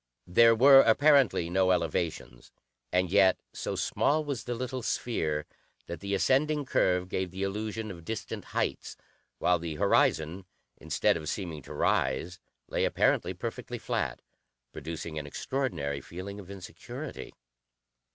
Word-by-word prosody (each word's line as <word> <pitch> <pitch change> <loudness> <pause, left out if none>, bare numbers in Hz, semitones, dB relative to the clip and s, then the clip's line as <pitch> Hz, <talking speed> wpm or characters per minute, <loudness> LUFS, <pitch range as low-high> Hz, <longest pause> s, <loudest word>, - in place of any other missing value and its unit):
There 115 +5 +5
were 135 +4 +8
apparently 135 - +4
no 95 0 +3
elevations, 85 -8 -2 0.4
and 90 -1 +1
yet, 95 -2 +5
so - - -4
small 155 +1 +1
was 140 -5 -4
the 120 - -3
little 130 +2 -4
sphere 80 -11 -1 0.4
that 85 - -6
the 100 +2 -2
ascending 145 +7 +2
curve 90 -7 +1
gave 95 0 -2
the 95 +2 -5
illusion 105 +2 -3
of 85 -3 -10
distant 110 +5 -5
heights, - - -3 0.4
while 90 +5 +2
the 80 -2 -5
horizon, 80 +4 +2 0.3
instead - - +1
of 80 -2 -5
seeming 85 -7 -4
to - - -10
rise, 85 +8 0 0.3
lay - - -1
apparently - - +1
perfectly - - -5
flat, - - -3 0.5
producing 80 +1 -6
an 75 - -7
extraordinary 70 - -3
feeling 95 +7 -8
of 95 -2 -11
insecurity. 95 -2 -8
95 Hz, 135 wpm, -29 LUFS, 85-115 Hz, 0.5 s, were